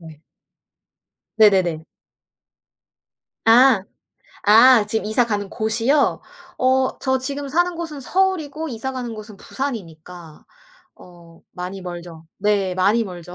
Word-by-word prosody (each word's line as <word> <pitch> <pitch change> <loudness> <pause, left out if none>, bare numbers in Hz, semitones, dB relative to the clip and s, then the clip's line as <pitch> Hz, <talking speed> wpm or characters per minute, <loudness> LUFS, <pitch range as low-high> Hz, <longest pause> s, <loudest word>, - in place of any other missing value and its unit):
네. 160 -2 -14 1.2
네네네. 185 -7 +3 1.6
아. 235 -1 +5 0.6
아. 225 +2 +6
지금 220 +1 -2
이사 225 +3 +2
가는 205 -3 -3
곳이요? 230 +6 0 0.4
어 260 0 +1
저 265 -1 0
지금 280 +2 -4
사는 350 +4 0
곳은 325 -4 -6
서울이고 320 -2 -1
이사 265 +1 -5
가는 245 -2 -5
곳은 215 -1 -11
부산이니까 180 - -8 0.5
어 170 -2 -17
많이 180 +2 -7
멀죠. 175 -2 -9
네, 200 -2 0
많이 205 +5 +2
멀죠. 180 -2 -10
220 Hz, 215 characters per minute, -20 LUFS, 180-265 Hz, 1.6 s, 아